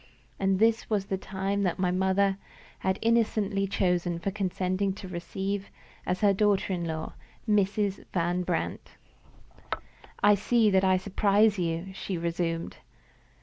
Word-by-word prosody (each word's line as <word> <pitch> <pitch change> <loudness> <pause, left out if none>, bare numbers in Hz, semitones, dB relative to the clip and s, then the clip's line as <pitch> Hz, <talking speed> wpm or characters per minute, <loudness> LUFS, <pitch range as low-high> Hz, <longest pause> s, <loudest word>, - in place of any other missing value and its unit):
And 195 -1 +2
this 225 +2 +2
was 205 -3 0
the 195 - -2
time 195 +1 -2
that 180 -4 0
my 180 -1 +1
mother 190 +1 +2 0.4
had 190 0 0
innocently 215 -3 +2
chosen 180 -3 0
for 180 +4 -2
consenting 190 0 -1
to 195 -1 -9
receive 190 +3 -4 0.4
as 180 - -1
her 205 -2 +5
daughter 200 -1 +2
in 175 -2 -2
law 160 -1 -4 0.3
Mrs. 205 -1 +1
Van 175 0 0
Brandt! 180 - -3 1.3
"I 205 0 +7
see 215 +2 +3
that 190 0 +4
I 185 -1 +4
surprise 200 +2 +2
you," 170 +2 -2
she 190 -1 -4
resumed. 165 0 -2
195 Hz, 140 wpm, -28 LUFS, 180-200 Hz, 1.3 s, I